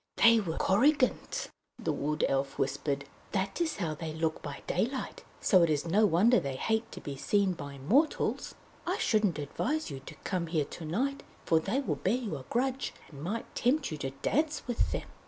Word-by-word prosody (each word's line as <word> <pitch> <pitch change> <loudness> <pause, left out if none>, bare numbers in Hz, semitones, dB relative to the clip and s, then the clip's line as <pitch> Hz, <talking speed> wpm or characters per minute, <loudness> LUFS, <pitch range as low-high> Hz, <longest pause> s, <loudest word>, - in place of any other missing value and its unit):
"They 230 0 +7
were 170 -6 -3
Korrigans!" 255 +7 +2 0.3
the 190 -10 -1
Wood 150 +2 0
Elf 135 0 -1
whispered. 140 +1 -1 0.3
"That 195 - -1
is 330 -2 0
how 165 -5 -1
they 155 0 -5
look 160 0 -1
by 145 -2 -7
daylight, 250 +8 -2 0.2
so 185 -4 +5
it 170 - +4
is 150 0 +1
no 205 +6 +4
wonder 205 +8 +5
that - - 0
they 135 -1 -3
hate 220 - 0
to - - -7
be 140 - -6
seen 195 +6 +2
by 140 -4 -7
mortals! 250 - +1 0.3
I - - +1
shouldn't 210 -7 +2
advise 235 - -2
you 135 - -5
to 135 - -11
come 180 -3 -1
here 160 -3 +1
to 165 - -8
night, 260 - -1 0.2
for 160 - +4
they 210 - 0
will 275 - -1
bear 195 +5 +1
you 225 -10 -3
a 130 - -10
grudge, 260 +2 -1 0.2
and 140 -2 -10
might 210 +8 -4
tempt 265 - +1
you 155 - -3
to 135 - -2
dance 305 0 +1
with 245 -2 0
them!" - - -3
185 Hz, 200 wpm, -30 LUFS, 150-240 Hz, 0.3 s, They